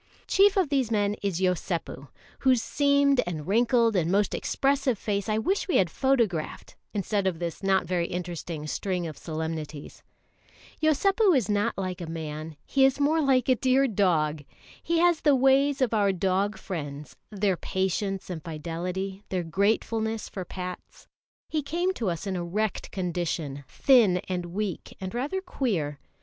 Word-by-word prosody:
Chief 400 +1 +4
of 370 -6 +2
these 270 -5 +1
men 205 -2 +1
is 195 -4 -1
Yosépu, 175 -6 -2 0.3
whose 260 -2 +4
seamed 280 -1 +3
and 155 -4 -4
wrinkled 230 +1 +3
and 175 -2 +1
most 200 0 +2
expressive 270 -3 +1
face 200 0 -2
I 215 - +1
wish 375 - 0
we 365 - +3
had 175 -3 +2
photographed, 230 -12 0 0.2
instead 200 -1 -1
of 180 -3 -1
this 170 -1 -4
not 195 -1 +2
very 175 -2 0
interesting 175 -3 -5
string 180 +3 -2
of 155 -2 -6
solemnities. 160 -2 -5 0.8
Yosépu 375 - +4
is 245 - -1
not 210 +2 +1
like 185 -1 -3
a 170 - -5
man, 155 -1 -6
he 270 - +2
is 270 +1 +4
more 310 +3 +3
like 265 -4 +3
a 260 - +6
dear 260 +2 +3
dog. 160 - +1 0.4
He 335 +1 0
has 345 -1 +3
the 290 -2 +5
ways 270 +2 +3
of 235 - 0
our 205 -2 +3
dog 195 +2 0
friends, 150 -5 -6
their 200 -2 0
patience 190 +2 -2
and 160 -3 -6
fidelity, 175 +5 -4
their 185 -2 -1
gratefulness 220 +5 0
for 190 - -5
pats. 180 0 -8 0.4
He 310 - -1
came 345 +6 -1
to 225 - -2
us 170 +2 -4
in 195 -1 -2
a 175 - -2
wrecked 205 +4 -2
condition, 170 -6 -3
thin 235 -10 +4
and 180 -2 -3
weak 190 0 -4
and 190 +1 -5
rather 285 +10 -2
queer. 180 - -2
195 Hz, 160 wpm, -27 LUFS, 175-260 Hz, 0.8 s, a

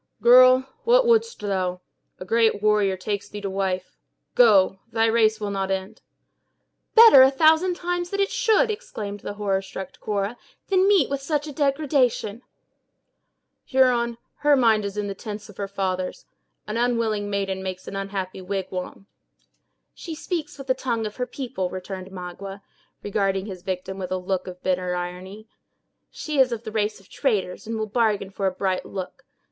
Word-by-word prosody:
"Girl, 255 +1 +7 0.2
what - - +4
wouldst 460 0 +2
thou? 185 -3 -1 0.4
A 185 - -7
great 220 0 +2
warrior 210 -3 +3
takes 200 +1 -4
thee 210 - -7
to 195 -1 -4
wife. 190 -1 -3 0.3
Go! 195 -5 +5
thy 225 0 +2
race 220 -1 +3
will 205 -1 -3
not 195 -1 -2
end." 190 0 -4 0.9
"Better, 445 - +10
a 260 - +8
thousand 320 +6 +3
times, 350 0 -3
it 395 0 0
should," 475 -2 +3
exclaimed 205 - -6
the 205 - -6
horror 200 -2 0
struck 190 -1 -8
Cora, 205 +2 -2 0.3
"than 380 0 +4
meet 390 -9 +4
with 280 0 -3
such 295 +1 -1
a 300 - -6
degradation!" 275 -6 0 1.2
"Huron, 245 -3 +2 0.2
her 295 -1 +4
mind 225 -5 +3
is 200 0 -5
in 210 - -1
the 200 - -3
tents 210 +1 -8
of 205 - -14
her 200 - -3
fathers. 185 -2 -3 0.4
An 215 - -4
unwilling 230 -4 0
maiden 195 -1 -2
makes 185 -1 -6
an - - -6
unhappy 195 -1 -4
wigwam." 185 0 -5 0.9
"She 330 -3 -7
speaks 320 -2 -4
with 275 - -8
the 260 - +2
tongue 235 -4 -2
of 210 - -6
her 250 -1 -2
people," 245 -9 -4
returned 185 0 -7
Magua, 195 +2 -8 0.4
regarding 195 -1 0
his 190 -4 -8
victim 190 +1 -4
with 185 -1 -5
a 185 - 0
look 185 0 -3
of 180 0 -9
bitter 180 -1 0
irony. 185 +4 -6 0.6
"She 300 -3 -4
is 260 -2 +5
of 235 0 -5
a 220 - -5
race 210 -1 -1
of 195 - -21
traders, 210 -8 -2
and 225 0 -3
will 220 - -1
bargain 210 -3 0
for 195 0 -1
a - - +1
bright 185 0 -1
look. 190 -2 -7
210 Hz, 170 wpm, -24 LUFS, 190-255 Hz, 1.2 s, Better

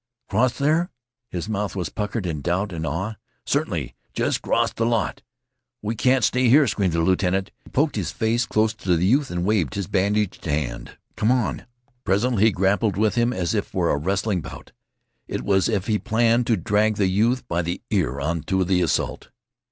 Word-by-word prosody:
"Cross 120 +5 +2
there?" 155 +5 +2 0.4
His 90 -2 -4
mouth 105 -2 -2
was 90 -4 -2
puckered 105 0 -3
in 80 -4 -3
doubt 90 +6 -1
and 80 -1 -3
awe. 100 +6 -3 0.3
"Certainly. - - -1 0.2
Jest - - 0
'cross - - +1
th' - - -17
lot! 115 -4 0 0.6
We 110 +2 -1
can't 125 +3 +2
stay 125 0 +3
here," 145 +4 +6
screamed 100 -6 0
the 85 - +1
lieutenant. 95 +2 +1
He - - -16
poked 145 -2 +1
his 90 -5 -1
face 115 +5 0
close 110 +1 +2
to 90 -5 0
the 85 - +1
youth 135 +7 +3
and 90 0 -2
waved 95 - +1
his 100 - -2
bandaged 100 +2 0
hand. 75 -7 -3 0.2
"Come 110 - +1
on!" 125 0 -1 0.4
Presently 110 +2 +2
he 110 - +5
grappled 95 +1 +1
with 110 0 +2
him 120 0 +2
as 90 -7 -1
if - - -1
for - - 0
a - - +1
wrestling 95 +4 0
bout. - - -10 0.6
It - - -4
was 95 0 +2
as 110 - +1
if 95 -1 -2
he 105 -2 +1
planned 115 +1 +2
to 115 - +3
drag 105 +4 +1
the 100 - +1
youth 110 +7 +1
by 85 +1 0
the 85 +1 -3
ear 75 - 0
on 80 +3 -1
to 95 0 +1
the 90 0 +2
assault. 85 - -1
100 Hz, 200 wpm, -23 LUFS, 90-115 Hz, 0.6 s, here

